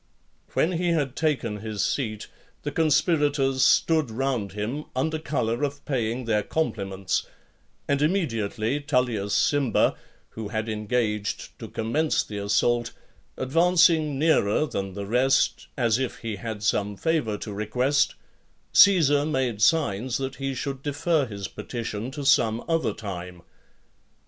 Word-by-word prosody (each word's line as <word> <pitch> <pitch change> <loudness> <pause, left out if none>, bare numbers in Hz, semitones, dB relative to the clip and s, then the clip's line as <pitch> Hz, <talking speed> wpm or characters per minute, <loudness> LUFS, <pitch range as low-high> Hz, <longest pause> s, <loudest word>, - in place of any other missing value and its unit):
LXXXII. - - -29
When 165 - +2
he 180 - 0
had 145 -5 -1
taken 150 -9 0
his 105 -1 -2
seat, 110 -6 -2 0.4
the - - -3
conspirators 145 -4 +2
stood 155 -5 +3
round 120 -4 -2
him, 115 +9 -3
under 155 +5 0
colour 120 -6 -1
of 145 -1 -3
paying 120 -2 -1
their 105 -2 +2
compliments; 100 -8 -2 0.6
and 140 0 +1
immediately 130 - 0
Tullius 120 -8 0
Cimber, 140 -6 +2 0.4
who 110 -2 -6
had 110 +2 -3
engaged 105 -1 -2
to - - -7
commence 145 +8 0
the 105 -1 -6
assault, 115 +4 +1 0.4
advancing 165 0 +3
nearer 150 -5 +3
than 100 -8 -4
the 100 -1 -4
rest, 125 +6 +2
as 120 -2 +2
if 130 -2 -2
he 110 -3 -4
had 110 -1 -6
some 105 -1 0
favour 150 -10 0
to 105 0 -7
request, 125 +7 +1 0.6
Caesar 155 -8 +6
made 130 -8 -1
signs 120 -3 +2
that 135 -1 -4
he 135 -1 -3
should 135 +1 -4
defer 145 +1 0
his 100 -3 -6
petition 115 -1 -5
to 140 +1 -6
some 120 -4 +3
other 165 -1 +1
time. 90 -4 -7
125 Hz, 135 wpm, -25 LUFS, 105-145 Hz, 0.6 s, Caesar